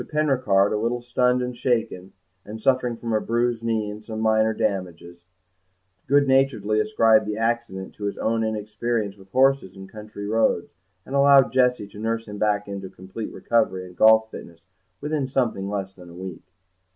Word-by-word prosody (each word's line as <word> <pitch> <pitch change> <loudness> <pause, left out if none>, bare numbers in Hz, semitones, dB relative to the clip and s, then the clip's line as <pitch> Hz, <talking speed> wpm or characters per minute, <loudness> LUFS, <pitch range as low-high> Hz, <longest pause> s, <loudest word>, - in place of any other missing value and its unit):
Penricarde, 130 -11 +1
a - - +1
little 120 +2 -2
stunned 125 +1 +1
and 125 0 -4
shaken, 115 -7 -2 0.3
and 110 +2 -8
suffering 125 0 +1
from 115 -1 -4
a 110 - +1
bruised 120 0 0
knee 110 -2 -1
and 105 +1 -8
some 110 0 -6
minor 110 0 +2
damages, 90 -4 -4 0.8
good 140 +1 +4
naturedly 125 -6 +2
ascribed 110 0 +3
the 105 0 -3
accident 115 -4 -2
to 105 - -7
his 100 - -3
own 115 0 0
inexperience 110 0 -2
with 95 -1 -18
horses 130 -5 +2
and 95 0 -11
country 105 -1 -9
roads, 110 -4 0 0.3
and 135 - -9
allowed 140 -1 +5
Jessie 125 -4 +2
to 105 - -12
nurse 115 +1 -2
him 105 0 -8
back 105 -1 0
into 100 -1 -6
complete 95 +5 -8
recovery 95 -6 0
and 90 -1 -13
golf 110 +1 +5
fitness 85 -1 -11 0.4
within 150 -2 -2
something 115 -7 -1
less 95 -2 -4
than 90 -2 -14
a 85 - -13
week. 95 -1 -8
110 Hz, 175 wpm, -23 LUFS, 100-120 Hz, 0.8 s, allowed